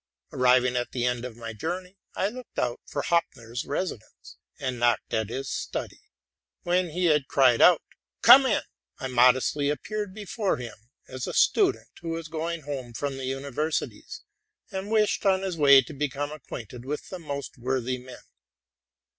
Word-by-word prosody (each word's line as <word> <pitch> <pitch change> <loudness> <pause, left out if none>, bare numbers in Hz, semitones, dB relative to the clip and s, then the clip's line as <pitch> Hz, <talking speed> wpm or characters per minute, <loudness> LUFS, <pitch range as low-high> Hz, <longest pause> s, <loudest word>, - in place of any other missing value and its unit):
Arrived 125 0 +4
at 125 -1 -1
the 120 -1 -1
end 125 -1 0
of 125 -3 -7
my 115 -1 -6
journey, 180 - -5 0.2
I 195 - +1
looked 250 +2 -11
out 120 -1 -1
for 145 - -3
Hopfner's 125 -8 -1
residence, 145 - -5 0.2
and 130 -2 -3
knocked 120 -2 +1
at 110 -2 0
his 135 +3 -4
study. - - -4 0.6
When 180 0 +1
he 180 +3 -1
had 150 -5 +3
cried 130 -4 +4
out, 180 - +7 0.2
'* - - -60
Come 270 0 +9
in!'' 220 - +1 0.3
I - - -6
modestly 130 +3 +3
appeared 205 +7 -3
before 210 -1 -2
him 115 -2 -10 0.2
as 130 -1 -5
a - - -4
student 390 -3 +3
who 170 - -5
was 165 -1 -4
going 165 +1 -3
home 130 -4 -5
from 140 +2 -3
the 135 - -5
universities, 140 +4 -3 0.5
and 190 +1 -4
wished 215 -1 +2
on 190 -1 +3
his 190 -3 -2
way 140 -3 +7
to 125 - -10
become 145 0 -2
acquainted 125 -5 -8
with 145 +3 -5
the 185 - -6
most 140 -5 -6
worthy 130 0 -1
men. 125 0 -12
140 Hz, 170 wpm, -26 LUFS, 125-175 Hz, 0.6 s, Come